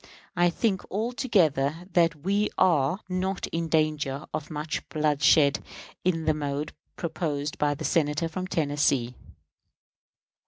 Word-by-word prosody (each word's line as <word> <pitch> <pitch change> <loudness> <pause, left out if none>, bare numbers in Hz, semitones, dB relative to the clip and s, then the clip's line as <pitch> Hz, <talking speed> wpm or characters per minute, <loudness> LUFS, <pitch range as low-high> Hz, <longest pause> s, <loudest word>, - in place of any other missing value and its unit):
I 175 0 +4
think, 190 +1 0
altogether, 180 - +1 0.4
we 200 +3 +1
are 165 +2 +3
not 185 +1 -2
in 165 0 -2
danger 155 -3 0
of 155 -1 -4
much 150 0 -3
bloodshed 150 -1 +3 0.4
in 165 -3 0
the 155 - +3
mode 145 0 -3 0.2
proposed 155 -3 -3
by 145 -1 +2
the 155 +2 -6
Senator 150 0 +1
from 185 +3 -4
Tennessee. 145 -7 +1
155 Hz, 115 wpm, -27 LUFS, 145-180 Hz, 0.4 s, I